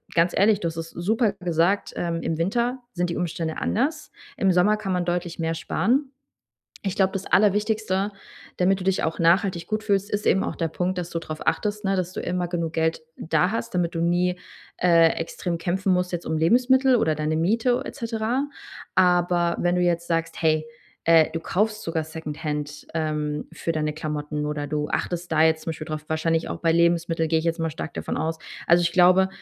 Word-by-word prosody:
ganz 170 +1 +3
ehrlich, 205 +1 +4
du 170 - 0
hast 165 - -9
es 165 0 -5
super 210 +5 0
gesagt, 180 +1 0
ähm, 170 -1 -2
im 160 0 -2
Winter 235 +9 0
sind 175 -1 -1
die - - -3
Umstände 165 -2 -3
anders. 300 +7 -1 0.3
Im 195 - +3
Sommer 185 +4 +3
kann 205 -3 -4
man 180 -1 0
deutlich 175 -1 -2
mehr 165 -1 -1
sparen. 260 - 0 0.7
Ich 195 -2 -2
glaube, 190 -1 +2
das 195 0 -4
Allerwichtigste, 210 0 +2 0.5
damit 185 +1 +3
du - - -5
dich 190 0 +1
auch 160 - -2
nachhaltig 170 +1 +2
gut 215 +2 -2
fühlst, 200 -2 +1
ist 205 0 -2
eben 190 - +3
auch - - -3
der 165 - -1
Punkt, 180 +3 -2
dass 175 -1 -4
du 165 - -2
drauf 155 -1 -7
achtest, 210 0 0
ne? 195 0 +1
Dass 185 -1 -2
du - - -4
immer 180 0 -1
genug 170 -2 -3
Geld 160 0 0 0.2
da 180 +3 +1
hast, 230 -1 -4
damit 175 -1 0
du - - -1
nie, 175 +1 +1 0.4
äh, 170 -2 +5
extrem 170 +1 -3
kämpfen 185 +3 0
musst 180 0 0
jetzt 175 -1 -4
um 160 - -1
Lebensmittel 255 - +4
oder 160 -9 +2
deine 155 +1 -1
Miete 225 +9 +1
et - - -7
cetera, 230 +4 -1 0.5
aber 175 -1 +3
wenn 175 0 +2
du - - +1
jetzt 170 -1 +1
sagst, 165 -1 -2
hey, 155 -1 +2 0.4
äh, 165 -1 +6
du 165 - -2
kaufst 210 +6 -1
sogar 165 -1 -1
secondhand, 150 -2 -5
ähm, 150 -2 -2
für 165 - -4
deine 155 -1 -1
Klamotten 150 -1 -4
oder 150 -1 -3
du 150 0 -2
achtest 175 0 -3
da 155 -1 +3
jetzt 160 0 +3
zum - - -3
Beispiel 155 -1 -6
drauf 155 -1 -5
wahrscheinlich 160 +1 0
auch - - -4
bei 165 -1 +2
Lebensmittel 170 -1 +2
gehe 160 0 +2
ich 160 - -4
jetzt 165 0 0
mal 165 0 0
stark 160 +1 -6
davon - - -4
aus. 160 0 -2 0.3
Also 170 +1 +5
ich 170 - +2
glaube, 185 +2 +5
175 Hz, 205 wpm, -24 LUFS, 160-195 Hz, 0.7 s, äh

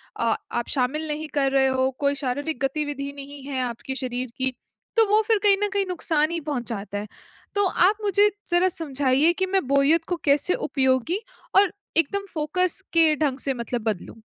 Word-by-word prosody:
अ, 230 -1 +1 0.2
आप 240 0 -2
शामिल 290 +4 -1
नहीं 305 +1 -3
कर 275 -1 +2
रहे 270 -1 +3
हो। 260 0 +1
कोई 280 0 +1
शारीरिक 285 +3 -2
गतिविधि 280 0 -3
नहीं 280 0 -8
है 270 -2 -3
आपके 245 +2 -5
शरीर 255 -2 -4
की, 260 0 +2 0.5
तो 450 - +7
वो 430 +1 +5
फिर 445 -2 +4
कहीं 400 -1 +6
न - - -2
कहीं 400 -1 +1
नुकसान 320 -3 0
ही 340 - -1
पहुँचाता 220 -6 -4
है। 210 - -6 0.5
तो 405 -1 +4
आप 380 +4 +3
मुझे 410 +1 +4 0.2
ज़रा 350 +2 +4
समझाइए 285 +1 +2
कि 375 - +2
मैं 380 -5 0
बोरियत 280 +5 +3
को 355 - +1
कैसे 285 +5 +3 0.2
उपयोगी 265 - +1 0.4
और 400 -3 +2 0.2
एकदम 395 +5 +2
फ़ोकस 355 +4 0
के 320 -2 +5
ढंग 285 -3 -1
से 270 - +2
मतलब 235 -1 -4
बदलूँ। 205 0 -5
285 Hz, 185 wpm, -24 LUFS, 260-345 Hz, 0.5 s, तो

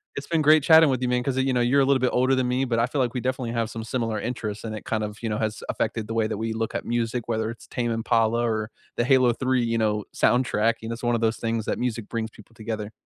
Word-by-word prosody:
It's - - -5
been 165 -2 +1
great 155 -1 +5
chatting 160 -2 +7
with 130 -1 0
you, - - +1
man, 125 0 +1
'cause, 130 0 -2
uh, - - +3
you 130 -1 +1
know, 125 - +2
you're 135 +4 +3
a - - +4
little 135 -1 +3
bit 125 - +2
older 130 +2 +2
than 130 -1 +1
me, 130 +2 +1
but 115 -2 0
I 120 - +2
feel, 140 - -3
like, 125 0 0
we 125 - -2
definitely 130 -2 -2
have 115 -1 -1
some 115 -1 -6
similar 115 -2 -2
interests, 110 -2 -4
and 110 -1 -4
it - - -8
kind 110 -1 -2
of, 105 0 -5
you 115 - -2
know, 105 - -1
has 110 -1 -2
affected 110 -2 -2
the 115 - -4
way 110 -1 +2
that 110 - -3
we 115 0 -2
look 110 0 -3
at - - -3
music, 120 0 -2
whether 110 -1 -1
it's 115 - -13
Tame 120 -1 -2
Impala 115 0 +1
or 110 -1 -1 0.3
the 120 - +2
Halo 130 -2 +5
3, 130 0 0
you 115 0 0
know, 105 -2 0
soundtrack, 115 -2 +2
you 115 - -6
know? - - -2
It's 115 - -9
one 120 0 +1
of 115 - -1
those 110 0 +1
things 115 -1 -2
that - - -1
music 115 -3 -3
brings 115 -1 -3
people 110 +2 -17
together. 110 -1 -5
115 Hz, 305 wpm, -25 LUFS, 110-125 Hz, 0.3 s, chatting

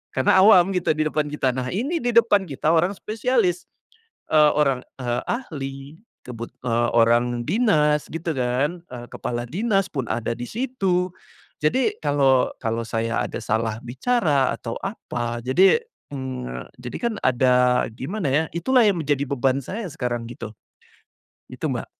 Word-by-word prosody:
karena 130 +7 +4
awam 190 -4 +7
gitu 180 -3 +1
di 155 - -1
depan 155 0 0
kita. 145 -3 0
Nah, 130 0 -2
ini 275 - -1
di 245 0 0
depan 225 -4 +4
kita 150 +1 -1
orang 175 +4 +2
spesialis, 215 -4 0 0.7
eee, 150 -1 +6
orang, 135 -4 +2 0.2
eee, 120 0 -1
ahli, 145 - -4 0.5
kebut 120 -2 -7
eee, 120 -1 +1
orang 120 +1 +3
dinas 150 -10 +2
gitu, 165 +1 -4
kan, 135 +7 -1
eee, 120 -1 -9
kepala 120 0 -3
dinas 195 +1 0
pun 135 -6 -3
ada 115 0 -2
di 120 +1 -6
situ. 195 -8 -1 0.5
Jadi 240 +12 +1
kalau 140 -3 +3
kalau 115 0 -1
saya 115 +2 -1
ada - - -5
salah 110 0 -1
bicara 140 - +1
atau 115 -1 -6
apa, 120 - -4
jadi 185 - +4 0.3
mmm, 130 - -6
jadi 125 0 -7
kan 235 -2 0
ada 125 0 +3
gimana, 165 - -3
ya, 150 +4 +2
itulah 245 +8 +3
yang 195 -5 +2
menjadi 140 -1 0
beban 135 0 +1
saya 210 - -5
sekarang 125 -5 -3
gitu, 115 -2 -8 1.0
itu - - -6
Mbak. - - -3
140 Hz, 150 wpm, -23 LUFS, 120-185 Hz, 1.0 s, awam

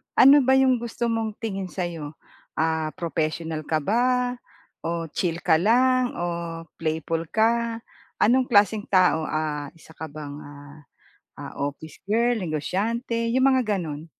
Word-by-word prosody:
Ano 280 +2 +8
ba 265 -1 +3
'yong 260 -2 +4
gusto 235 0 -3
mong 225 -2 -2
tingin 195 -4 -4
sa 185 +1 -4
'yo? 160 -3 -6 0.4
Ah, 160 -1 -1
professional 160 -1 -3
ka 155 -2 0
ba 245 - +1 0.5
o 170 0 -2
chill 170 0 -2
ka 160 -3 +4
lang 250 +5 +3
o 175 - -2 0.5
playful 160 +1 -2
ka? 230 +3 +1 0.4
Anong 250 +3 +3
klaseng 210 -1 +3
tao, 180 -4 +3
ah, 150 -2 -2
isa 160 - -17
ka 160 0 -7
bang, 145 -1 -8
ah 145 0 -12 0.6
ah - - -8
office 145 +2 -5
girl, 235 +2 +2
negosyante, 215 - -2
'yong 260 - +3
mga 245 -6 +1
gano'n? 155 -4 -5
185 Hz, 145 wpm, -24 LUFS, 155-235 Hz, 0.6 s, Ano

